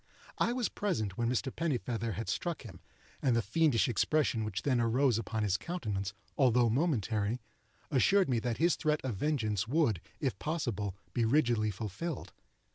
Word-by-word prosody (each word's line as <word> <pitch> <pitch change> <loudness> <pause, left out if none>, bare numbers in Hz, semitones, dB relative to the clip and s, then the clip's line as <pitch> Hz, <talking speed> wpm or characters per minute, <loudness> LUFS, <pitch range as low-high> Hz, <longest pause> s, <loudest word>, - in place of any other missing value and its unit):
I - - +3
was 245 -2 0
present 110 - -2
when 120 +2 0
Mr. 130 +2 -1
Pennifeather 120 -8 -1
had 110 +2 -4
struck 170 - -2
him, - - -10 0.4
and 125 -3 +3
the 115 - +3
fiendish 135 +2 +3
expression 125 +1 +1
which 105 -2 -3
then 130 -4 +2
arose 120 0 +3
upon 110 0 -2
his 100 -2 +2
countenance, 105 - -3 0.2
although 125 -4 +4
momentary, 115 - 0 0.5
assured 190 +8 +4
me 125 -3 +1
that 120 0 -2
his 170 +2 +3
threat 155 -1 0
of 130 -5 -2
vengeance 110 -8 0
would, 130 - +2 0.2
if 135 -4 -1
possible, 115 - -2 0.2
be 120 - +1
rigidly 115 -3 +3
fulfilled. 110 - -5
120 Hz, 160 wpm, -32 LUFS, 110-150 Hz, 0.5 s, although